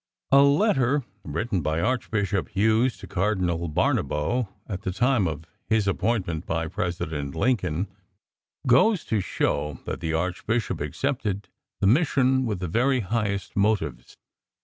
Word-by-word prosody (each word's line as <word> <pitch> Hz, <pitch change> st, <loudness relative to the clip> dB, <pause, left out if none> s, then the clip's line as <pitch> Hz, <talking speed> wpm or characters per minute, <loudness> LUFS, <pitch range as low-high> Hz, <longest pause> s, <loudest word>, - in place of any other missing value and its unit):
A 140 Hz, 0 st, +8 dB
letter 140 Hz, -, +3 dB, 0.2 s
written 95 Hz, +5 st, -2 dB
by 80 Hz, +2 st, 0 dB
Archbishop 100 Hz, -2 st, 0 dB
Hughes 110 Hz, +5 st, +2 dB
to -, -, -10 dB
Cardinal 90 Hz, -3 st, 0 dB
Barnabo, 75 Hz, +9 st, 0 dB, 0.2 s
at 95 Hz, -3 st, -4 dB
the 95 Hz, -3 st, -2 dB
time 115 Hz, 0 st, +2 dB
of 80 Hz, 0 st, -5 dB, 0.2 s
his 110 Hz, -3 st, +2 dB
appointment 95 Hz, -5 st, -1 dB
by 80 Hz, 0 st, -1 dB
President 80 Hz, -6 st, -3 dB
Lincoln, 95 Hz, -4 st, +1 dB, 0.8 s
goes 160 Hz, -, +4 dB
to 110 Hz, -3 st, 0 dB
show 75 Hz, -5 st, -1 dB
that -, -, -4 dB
the 80 Hz, -, -2 dB
Archbishop 90 Hz, +3 st, -1 dB
accepted 105 Hz, -, -2 dB, 0.3 s
the -, -, +2 dB
mission 130 Hz, -, +3 dB
with 100 Hz, -5 st, -3 dB
the 90 Hz, -, -2 dB
very 125 Hz, +8 st, +2 dB
highest 100 Hz, -1 st, -2 dB
motives. 95 Hz, -, 0 dB
100 Hz, 130 wpm, -25 LUFS, 85-120 Hz, 0.8 s, A